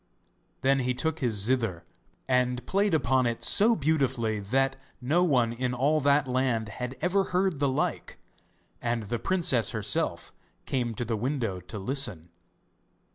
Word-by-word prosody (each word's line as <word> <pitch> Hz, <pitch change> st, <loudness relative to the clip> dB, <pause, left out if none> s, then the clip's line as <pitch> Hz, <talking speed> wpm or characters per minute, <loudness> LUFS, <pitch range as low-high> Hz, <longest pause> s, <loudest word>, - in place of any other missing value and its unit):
Then 135 Hz, +1 st, +3 dB
he 125 Hz, -1 st, -1 dB
took 160 Hz, +4 st, -1 dB
his 120 Hz, -6 st, 0 dB
zither 105 Hz, -5 st, 0 dB, 0.4 s
and 125 Hz, -1 st, +1 dB
played 200 Hz, -2 st, +1 dB
upon 130 Hz, -3 st, +2 dB
it 115 Hz, -1 st, -3 dB
so 225 Hz, +3 st, +5 dB
beautifully 130 Hz, -, 0 dB
that 135 Hz, +7 st, 0 dB, 0.2 s
no 155 Hz, +8 st, +1 dB
one 125 Hz, -9 st, +2 dB
in 125 Hz, +1 st, -2 dB
all 145 Hz, +5 st, +2 dB
that 140 Hz, 0 st, +2 dB
land 125 Hz, -4 st, 0 dB
had 125 Hz, +3 st, -6 dB
ever 190 Hz, +3 st, +1 dB
heard 180 Hz, -4 st, 0 dB
the 140 Hz, -1 st, +2 dB
like, 130 Hz, -, -2 dB, 0.6 s
and 120 Hz, -1 st, -1 dB
the 115 Hz, +3 st, -3 dB
princess 140 Hz, -, +1 dB
herself 105 Hz, -2 st, -1 dB, 0.3 s
came 120 Hz, -4 st, -2 dB
to 120 Hz, -, -3 dB
the 115 Hz, 0 st, -1 dB
window 115 Hz, -5 st, -2 dB
to 90 Hz, +4 st, -9 dB
listen. 100 Hz, -, -1 dB
125 Hz, 150 wpm, -27 LUFS, 115-140 Hz, 0.6 s, so